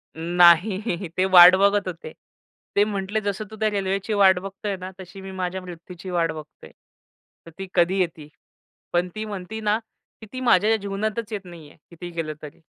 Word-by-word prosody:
नाही 175 +3 +3
ते 185 - +3
वाट 180 -1 +9
बघत 200 +1 +2
होते. 165 -3 -7 0.6
ते 205 - +5
म्हटले 205 +1 -3
जसं 205 +1 -3
तू - - -8
त्या 215 -1 +2
रेल्वेची 195 +1 -2
वाट 190 -3 +5
बघतो 195 +2 -8
आहे 200 -2 -2
ना 185 +1 -8
तशी 190 +1 -11
मी 190 - -8
माझ्या 185 0 -4
मृत्यूची 180 +1 -10
वाट 170 -2 0
बघतो 155 -2 -11
आहे. - - -14 0.7
तर 165 - -12
ती 195 - -5
कधी 180 +2 +2
येती? 165 -4 -2 0.7
पण 175 +1 +1
ती 215 0 -4
म्हणती 205 +1 -6
ना, 210 0 +1 0.4
की - - -9
ती 255 - -5
माझ्या 220 -2 +4
जीवनातच 215 +2 -4
येत 200 -2 -5
नाही 170 -4 -12
आहे. - - -21
कितीही 175 +1 -9
केलं 165 -2 -4
तरी. 150 -1 -11
190 Hz, 190 wpm, -23 LUFS, 175-205 Hz, 0.7 s, वाट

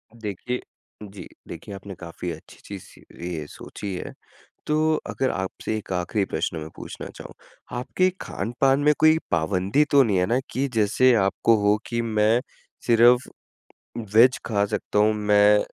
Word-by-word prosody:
देखिए, 115 +3 -4 0.4
जी। 100 -1 -10 0.2
देखिए 100 - -8
आपने 95 0 -9
काफ़ी 85 0 -6
अच्छी 80 - -12
चीज़-सी 100 -2 -10 0.3
ये 80 -2 -4
सोची 100 +5 -8
है। 90 - -6 0.5
तो 155 +1 +2
अगर 130 -1 -1
आपसे 95 +3 -4
एक 105 - -8
आख़िरी 90 +3 -1
प्रश्न 85 - -3
मैं 80 0 -6
पूछना - - -8
चाहूँ, - - -10 0.5
आपके 185 +8 +1
खानपान 130 +6 0
में 150 +1 +5
कोई 155 0 +6
पाबंदी 95 - +1
तो 140 -1 +6
नहीं 105 -6 +1
है 90 - +2
ना 120 +6 +1
कि 135 +2 -1
जैसे 115 +4 +4
आपको 115 +3 +2
हो 105 +1 +4
कि 115 0 -1
मैं 110 +1 +2 0.5
सिर्फ़ 120 +2 +5 0.9
वेज 125 +3 +6
खा 100 -3 +1
सकता 105 0 -2
हूँ 105 +1 +4
मैं 105 0 +4
105 Hz, 155 wpm, -24 LUFS, 95-125 Hz, 0.9 s, कोई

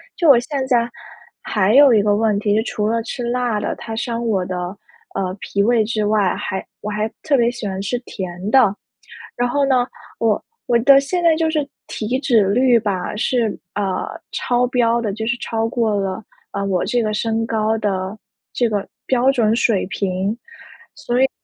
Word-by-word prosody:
就 335 - +2
我 260 -4 +8
现 270 +1 -3
在 240 -2 +2 0.5
还 210 -1 +1
有 280 -2 +8
一 215 - +5
个 205 0 +2
问 215 -1 +2
题， 205 0 +1
就 220 - +2
除 210 -2 -2
了 230 +1 0
吃 245 +2 -5
辣 240 -2 0
的， - - -2
它 225 - -7
伤 235 0 -2
我 195 -5 0
的， 185 0 -4 0.6
呃， 185 -1 -2
脾 200 - -1
胃 225 +1 +3
之 215 -1 -1
外， 205 -3 +2
还 190 - -4
我 210 - -5
还 210 +1 -1
特 295 - +2
别 240 -2 +3
喜 240 -3 -5
欢 190 0 -3
吃 240 +5 -2
甜 185 +1 -5
的。 230 -5 +5 0.6
然 245 0 0
后 285 +3 +1
呢， 255 -2 +2 0.3
我 225 -3 +1 0.2
我 235 -1 +3
的 275 +3 +7
现 345 +6 -2
在 330 -2 +5
就 320 0 +1
是 300 -3 -1 0.2
体 230 +4 -2
脂 230 -7 +3
率 245 +2 +4
吧， 200 -4 -2
是， 230 0 0 0.2
啊， 195 -2 -2 0.2
超 245 0 +1
标 235 -2 +2
的， 210 -4 -2
就 220 +2 -4
是 245 +1 0
超 225 -1 -2
过 225 -3 0
了， 195 +1 -2 0.3
啊， 200 - -3
我 190 -2 0
这 245 - +1
个 215 -1 -1
身 225 +1 0
高 220 -1 0
的 195 -1 -2 0.4
这 240 - +2
个 205 -3 -2 0.2
标 260 +1 +3
准 225 -4 +2
水 225 -4 +2
平， 195 +1 -2 0.6
所 240 +1 -1
以 - - +5
呢 - - -1
225 Hz, 210 characters per minute, -20 LUFS, 205-245 Hz, 0.6 s, 我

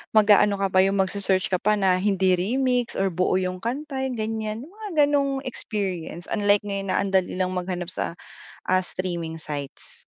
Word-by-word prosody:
mag-aano 205 -1 +6
ka 195 - +1
pa 185 - +4
yung 195 +1 +1
magse-search 190 -1 0
ka 185 - +3
pa 210 +2 +2
na 190 -3 +3
hindi 190 -2 +2
remix 245 +5 0
or 195 0 +1
buo 180 +2 +1
yung 185 -1 -1
kanta 270 +5 -4
yung 250 - -4
ganyan, 220 +1 -3
yung 330 - -13
mga 425 -1 -8 0.2
ganung 275 -2 +1
experience. 190 -8 -4
Unlike 205 -1 +3
ngayon 195 -1 -3
na - - +2
ang 200 - -2
dali 190 -2 +2
lang 185 0 0
maghanap 180 -1 -3
sa 170 - -3 0.5
ah, 185 0 +3
streaming 170 -3 -4
sites. 145 -3 -7
195 Hz, 185 wpm, -24 LUFS, 185-220 Hz, 0.5 s, mag-aano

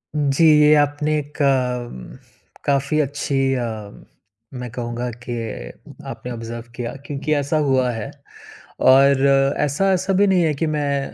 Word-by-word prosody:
हुँ, 145 -2 +1
जी 165 +5 +3
ये 150 0 +6
आपने 150 +1 +1
एक 150 +1 -6
अम, 125 - -1 0.5
काफ़ी 140 +2 +1
अच्छी 145 0 -3 0.2
अ, 125 -2 -1 0.9
मैं 125 -1 -6
कहूँगा 120 0 -4 0.2
कि 120 - -4 0.8
आपने 125 - -7
ऑब्जर्व 115 0 -6
किया, 120 0 -4
क्योंकि 145 +1 -2
ऐसा 145 +1 0
हुआ 130 -2 +2
है। 110 -3 -5 0.7
और 135 +1 +5 0.3
ऐसा-ऐसा 185 +6 +1
भी 200 +2 +3
नहीं 185 -3 +3
है 155 - +1
कि 160 - +2
मैं 140 -2 -2
140 Hz, 140 wpm, -21 LUFS, 125-150 Hz, 0.9 s, ये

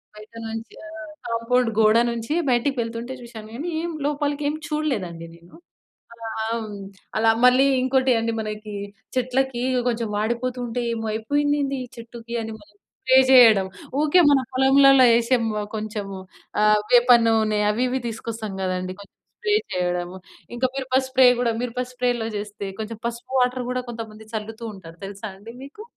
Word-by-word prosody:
బయట 215 +2 -14
నుంచి 225 +1 -6
ఆ! - - -10 0.4
కాంపౌండ్ 230 +1 +1
గోడ 215 +1 +5
నుంచి 235 +5 -3 0.2
బయటికి 250 +3 +1
వెళ్తుంటే 230 +2 -5
చూసాను 225 -2 -10
గానీ 320 +7 -4
ఏం 345 - -3
లోపలికి 290 0 -1
ఏం 295 - -2
చూడలేదండి 205 - -3
నేను. 170 +1 -18 0.6
అలా 230 -1 -8
హ్మ్. 220 -2 -3 0.4
అలా 225 +1 +4
మళ్ళీ 255 +2 +6 0.2
ఇంకోటి 260 0 +2
అండి 230 0 -1
మనకి 215 -1 -6 0.4
చెట్లకి 255 0 0
ఇగ 255 -1 +1
కొంచెం 230 -2 -1
వాడిపోతుంటే 240 +2 -2
ఏమో 225 -1 -3
అయిపోయిందేంది 285 +4 0
ఈ - - -9
చెట్టుకి 235 0 -9
అని 225 - -6
మళ్ళీ 205 0 -21 0.3
స్ప్రే 260 0 +5
చేయడం. 225 -7 +7 0.4
ఓకే 310 +4 +5
మన 280 -2 +5
పొలంలలో 270 0 +6
వేసి 235 +2 +3 0.4
కొంచెం 210 -1 -4 0.5
ఆ! - - +5 0.3
వేప 245 0 +6 0.2
నూనె 220 -2 +2
అవి 230 +4 0
ఇవి 260 +1 -1
తీసుకొస్తాం 225 -2 -5
కదండీ. 185 0 -2
కొంచెం 200 - -15 0.2
స్ప్రే 420 -3 +1 0.2
చేయడము. 180 0 -2 0.4
ఇంకా 260 - +2
మిరప 260 -1 -4
స్ప్రే 260 0 +5
కూడా 235 -2 +1
మిరప 250 0 -3
స్ప్రేలో 245 -2 -1
చేస్తే 205 -1 -6
కొంచెం 220 0 -5
పసుపు 235 +2 -6
వాటర్ 250 0 +1
కూడా 255 0 -1
కొంతమంది 220 -2 -8
చల్లుతూ 220 +2 -5
ఉంటారు 165 -3 -13
తెలుసా 200 +2 -7
అండి 220 +4 -12
మీకు? 290 +10 -11
230 Hz, 155 wpm, -23 LUFS, 215-255 Hz, 0.6 s, చేయడం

